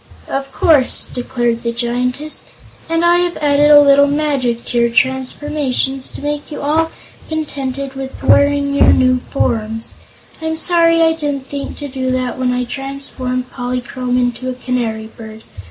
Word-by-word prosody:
"Of 270 Hz, 0 st, -4 dB
course," 290 Hz, -3 st, +3 dB
declared 240 Hz, -2 st, -2 dB
the 235 Hz, -, -2 dB
Giantess; 250 Hz, +5 st, -2 dB, 0.5 s
"and 330 Hz, +1 st, +1 dB
I 345 Hz, 0 st, +5 dB
have 355 Hz, 0 st, 0 dB
added 290 Hz, 0 st, +3 dB
a 295 Hz, -1 st, +9 dB
little 285 Hz, 0 st, +6 dB
magic 280 Hz, -5 st, -1 dB
to 240 Hz, -, -1 dB
your 235 Hz, 0 st, +3 dB
transformations 265 Hz, +1 st, 0 dB
to -, -, -7 dB
make 295 Hz, 0 st, -3 dB
you -, -, -5 dB
all 315 Hz, +3 st, +1 dB, 0.4 s
contented 275 Hz, -3 st, -4 dB
with 270 Hz, 0 st, -7 dB
wearing 285 Hz, 0 st, +3 dB
your 280 Hz, -, +5 dB
new 255 Hz, 0 st, +3 dB
forms. 225 Hz, -3 st, -2 dB, 0.5 s
I'm 320 Hz, 0 st, -2 dB
sorry 330 Hz, -1 st, +3 dB
I 325 Hz, 0 st, +4 dB
didn't 290 Hz, -4 st, -3 dB
think 280 Hz, 0 st, -6 dB
to 290 Hz, -, -5 dB
do 260 Hz, -1 st, -3 dB
that 255 Hz, 0 st, -2 dB
when 255 Hz, -1 st, +1 dB
I 250 Hz, 0 st, 0 dB
transformed 255 Hz, -1 st, -4 dB
Polychrome 250 Hz, 0 st, -3 dB
into 250 Hz, +1 st, -1 dB
a 255 Hz, -, -4 dB
Canary 240 Hz, -4 st, -2 dB
Bird. 220 Hz, 0 st, -11 dB
265 Hz, 155 wpm, -16 LUFS, 250-290 Hz, 0.5 s, a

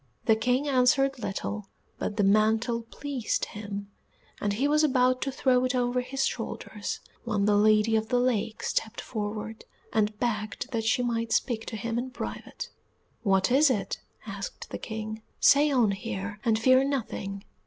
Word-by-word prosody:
The 220 Hz, -, +5 dB
King 250 Hz, +6 st, +1 dB
answered 270 Hz, 0 st, +3 dB
little, 205 Hz, -1 st, -4 dB, 0.3 s
but 210 Hz, -, -3 dB
the 205 Hz, -, +3 dB
mantle 220 Hz, +4 st, +3 dB
pleased 255 Hz, +1 st, -2 dB
him, 205 Hz, -1 st, -7 dB, 0.5 s
and 205 Hz, -1 st, 0 dB
he 260 Hz, +7 st, +1 dB
was 300 Hz, +1 st, +3 dB
about 255 Hz, -3 st, +3 dB
to 275 Hz, -, -1 dB
throw 255 Hz, -1 st, +2 dB
it 255 Hz, 0 st, 0 dB
over 250 Hz, 0 st, +1 dB
his 270 Hz, +2 st, -1 dB
shoulders -, -, -4 dB, 0.2 s
when 210 Hz, -4 st, 0 dB
the 210 Hz, 0 st, +4 dB
Lady 215 Hz, +1 st, +4 dB
of 220 Hz, 0 st, +1 dB
the 245 Hz, -, +2 dB
Lake 230 Hz, -3 st, 0 dB
stepped 225 Hz, +1 st, -1 dB
forward, 215 Hz, 0 st, -4 dB, 0.3 s
and 210 Hz, -1 st, +1 dB
begged 215 Hz, +2 st, -2 dB
that 225 Hz, -2 st, -1 dB
she 245 Hz, +2 st, +2 dB
might 230 Hz, -1 st, -1 dB
speak 230 Hz, -4 st, 0 dB
to 225 Hz, -, -4 dB
him 235 Hz, +1 st, -2 dB
in 255 Hz, +2 st, -4 dB
private. -, -, -6 dB, 0.5 s
"What 195 Hz, 0 st, +2 dB
is 285 Hz, +3 st, +6 dB
it?" 200 Hz, -7 st, -1 dB, 0.2 s
asked 200 Hz, -2 st, -7 dB
the -, -, -4 dB
King. 220 Hz, 0 st, -5 dB, 0.2 s
"Say 290 Hz, +1 st, +6 dB
on 245 Hz, -7 st, +3 dB
here, 200 Hz, +2 st, -4 dB
and 225 Hz, -3 st, +3 dB
fear 255 Hz, +3 st, +5 dB
nothing." 205 Hz, -7 st, -3 dB
225 Hz, 165 wpm, -28 LUFS, 210-255 Hz, 0.5 s, is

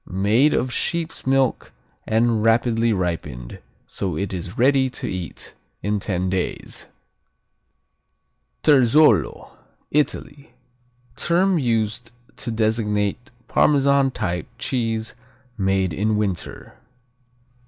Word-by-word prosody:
Made 105 Hz, +10 st, +3 dB
of 125 Hz, 0 st, -1 dB
sheep's 165 Hz, -5 st, -3 dB
milk 135 Hz, -2 st, +1 dB, 0.4 s
and 110 Hz, 0 st, +2 dB
rapidly 115 Hz, 0 st, +2 dB
ripened, 85 Hz, -, -3 dB, 0.3 s
so 90 Hz, -6 st, -3 dB
it 100 Hz, +2 st, -3 dB
is 90 Hz, +2 st, -6 dB
ready 130 Hz, +1 st, +3 dB
to 125 Hz, 0 st, -6 dB
eat 90 Hz, -5 st, -6 dB, 0.3 s
in 105 Hz, 0 st, 0 dB
ten 95 Hz, -2 st, -2 dB
days. 95 Hz, -1 st, -3 dB, 1.8 s
Terzolo 145 Hz, +2 st, +4 dB, 0.4 s
Italy 140 Hz, -3 st, -2 dB, 0.6 s
Term 180 Hz, +1 st, +2 dB
used 115 Hz, -2 st, -1 dB, 0.3 s
to -, -, -5 dB
designate 110 Hz, +1 st, -1 dB, 0.2 s
Parmesan 140 Hz, -1 st, +3 dB
type 90 Hz, -8 st, -3 dB
cheese 115 Hz, -3 st, -2 dB, 0.4 s
made 95 Hz, -3 st, 0 dB
in 105 Hz, +5 st, 0 dB
winter. 100 Hz, -5 st, -4 dB
115 Hz, 95 wpm, -22 LUFS, 95-130 Hz, 1.8 s, Terzolo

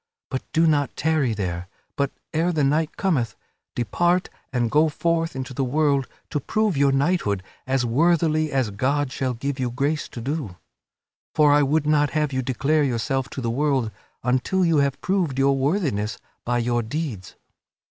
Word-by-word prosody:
But 130 Hz, -, -1 dB
do 165 Hz, +1 st, +3 dB
not 145 Hz, -4 st, +2 dB
tarry 145 Hz, -7 st, +1 dB
there, 90 Hz, -3 st, -3 dB, 0.3 s
but, 140 Hz, -1 st, +1 dB, 0.2 s
ere 165 Hz, +3 st, +2 dB
the 155 Hz, -4 st, +1 dB
night 150 Hz, +3 st, +1 dB
cometh, 130 Hz, -, 0 dB, 0.4 s
depart 175 Hz, -, +1 dB, 0.2 s
and 120 Hz, -3 st, 0 dB
go 155 Hz, +1 st, +4 dB
forth 165 Hz, 0 st, 0 dB
into 130 Hz, 0 st, -5 dB
the 135 Hz, -, -1 dB
world 140 Hz, 0 st, +1 dB, 0.2 s
to 150 Hz, -, 0 dB
prove 215 Hz, -, 0 dB
your 140 Hz, 0 st, +3 dB
knighthood 135 Hz, -, +1 dB, 0.2 s
as 130 Hz, -1 st, +1 dB
worthily 155 Hz, +3 st, +2 dB
as 130 Hz, -6 st, 0 dB
God 135 Hz, +6 st, 0 dB
shall 130 Hz, -2 st, -2 dB
give 135 Hz, +3 st, -3 dB
you 125 Hz, -1 st, 0 dB
grace 140 Hz, +5 st, -1 dB
to -, -, -8 dB
do. 125 Hz, -, -4 dB, 0.8 s
For 150 Hz, -2 st, +5 dB
I 145 Hz, -, +5 dB
would 145 Hz, +2 st, +2 dB
not 150 Hz, -1 st, +3 dB
have 150 Hz, -2 st, 0 dB
you 130 Hz, -, 0 dB
declare 140 Hz, +4 st, +1 dB
yourself 135 Hz, +1 st, -1 dB
to 135 Hz, -, -6 dB
the 115 Hz, -2 st, -1 dB
world 135 Hz, -3 st, +1 dB, 0.3 s
until 130 Hz, +10 st, +1 dB
you 165 Hz, -2 st, +3 dB
have 140 Hz, -1 st, +1 dB
proved 180 Hz, -8 st, 0 dB
your 135 Hz, 0 st, +3 dB
worthiness 135 Hz, -, 0 dB, 0.3 s
by 120 Hz, 0 st, +1 dB
your 120 Hz, 0 st, +1 dB
deeds. 120 Hz, -, -5 dB
140 Hz, 170 wpm, -23 LUFS, 125-155 Hz, 0.8 s, For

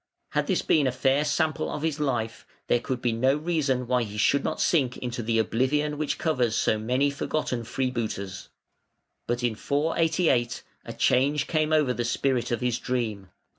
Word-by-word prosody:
Had -, -, -1 dB
this -, -, +1 dB
been 145 Hz, -4 st, +3 dB
a -, -, +1 dB
fair 135 Hz, +3 st, +2 dB
sample 155 Hz, 0 st, 0 dB
of 150 Hz, -, -4 dB
his 160 Hz, -2 st, -1 dB
life, 120 Hz, -6 st, -2 dB, 0.2 s
there 120 Hz, -, +2 dB
could 125 Hz, +1 st, -4 dB
be 120 Hz, -, +2 dB
no 130 Hz, +4 st, +2 dB
reason 150 Hz, -6 st, 0 dB
why 125 Hz, 0 st, +1 dB
he 105 Hz, -2 st, -5 dB
should 140 Hz, +6 st, +3 dB
not -, -, -2 dB
sink 135 Hz, -7 st, +2 dB
into 120 Hz, -1 st, -4 dB
the 115 Hz, 0 st, 0 dB
oblivion 130 Hz, +7 st, +1 dB
which 155 Hz, -, -1 dB
covers 125 Hz, -8 st, 0 dB
so 110 Hz, -, +1 dB
many 130 Hz, +6 st, +1 dB
forgotten 140 Hz, -4 st, -2 dB
freebooters. 115 Hz, -6 st, -3 dB, 0.8 s
But 120 Hz, +1 st, -1 dB
in 120 Hz, -2 st, +1 dB
488 150 Hz, -1 st, +1 dB, 0.2 s
a -, -, -6 dB
change 140 Hz, +3 st, +2 dB
came 155 Hz, -1 st, 0 dB
over 150 Hz, -5 st, +3 dB
the 120 Hz, -, -2 dB
spirit 125 Hz, +1 st, 0 dB
of 120 Hz, -2 st, -1 dB
his 125 Hz, -1 st, 0 dB
dream. 110 Hz, -7 st, -3 dB
125 Hz, 175 wpm, -26 LUFS, 120-150 Hz, 0.8 s, been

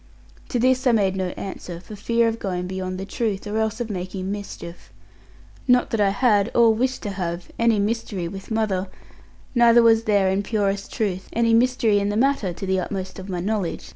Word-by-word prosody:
To 250 Hz, -, -1 dB
this 255 Hz, +2 st, +2 dB
I 245 Hz, -, +5 dB
made 195 Hz, -4 st, +2 dB
no 190 Hz, -1 st, -1 dB
answer, 180 Hz, -3 st, -6 dB
for 210 Hz, +4 st, -10 dB
fear 230 Hz, +3 st, +1 dB
of 225 Hz, 0 st, -2 dB
going 180 Hz, -2 st, -3 dB
beyond 185 Hz, 0 st, -4 dB
the 190 Hz, -, -4 dB
truth, 210 Hz, -1 st, -2 dB
or 210 Hz, +1 st, -2 dB
else 220 Hz, +1 st, -1 dB
of 235 Hz, -2 st, -3 dB
making 185 Hz, 0 st, -4 dB
mischief. 200 Hz, -4 st, -8 dB, 0.8 s
Not 250 Hz, -1 st, +3 dB
that 225 Hz, -, +1 dB
I 200 Hz, -, +4 dB
had, 210 Hz, -1 st, +2 dB
or 230 Hz, -1 st, +6 dB
wished 255 Hz, +3 st, -1 dB
to 205 Hz, -, -3 dB
have, 175 Hz, -2 st, -4 dB
any 230 Hz, -1 st, +3 dB
mystery 205 Hz, -4 st, -2 dB
with 195 Hz, +2 st, -8 dB
mother; 210 Hz, -4 st, 0 dB, 0.7 s
neither 235 Hz, -1 st, +6 dB
was 225 Hz, 0 st, +4 dB
there 200 Hz, -3 st, +3 dB
in 195 Hz, +1 st, +1 dB
purest 200 Hz, -1 st, -1 dB
truth, 190 Hz, -4 st, -2 dB
any 230 Hz, 0 st, +2 dB
mystery 230 Hz, -3 st, +3 dB
in 200 Hz, 0 st, 0 dB
the 205 Hz, -, -1 dB
matter; 260 Hz, -6 st, +2 dB
to 175 Hz, +3 st, -6 dB
the 190 Hz, 0 st, +1 dB
utmost 190 Hz, 0 st, -5 dB
of 190 Hz, +1 st, -9 dB
my 180 Hz, -2 st, -2 dB
knowledge. 185 Hz, -, -2 dB
205 Hz, 200 wpm, -23 LUFS, 190-230 Hz, 0.8 s, or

